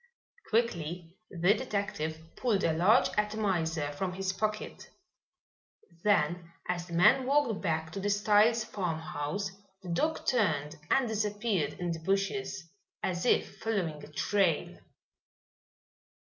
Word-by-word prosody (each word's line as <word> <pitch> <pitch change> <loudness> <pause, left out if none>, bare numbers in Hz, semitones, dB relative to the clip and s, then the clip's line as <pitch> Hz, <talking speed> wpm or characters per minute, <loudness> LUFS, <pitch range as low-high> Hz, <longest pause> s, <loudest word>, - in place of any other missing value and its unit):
Quickly 175 -7 -1
the 180 +2 +3
detective 200 -10 -2 0.2
pulled 220 -6 +1
a 160 - +3
large 190 +10 +4
atomizer 180 -8 0
from 180 +5 -3
his 190 +1 -2
pocket. 215 +1 -3 1.1
Then, 175 -4 +1 0.2
as 175 -1 -2
the 170 - -9
man 250 +10 +5
walked 275 -7 +2
back 160 -3 -1
to 195 - -5
the 205 +1 -1
Styles' 210 +3 +4
farmhouse, 180 -2 -3 0.3
the 180 - -7
dog 310 - 0
turned 160 - +1
and 270 -2 +3
disappeared 210 -7 -1
in 175 -1 -3
the 165 - -3
bushes 195 0 -1 0.4
as 175 +4 -1
if - - +1
following 175 -9 -2
a - - -11
trail. 185 0 +1
190 Hz, 120 wpm, -30 LUFS, 165-210 Hz, 1.1 s, man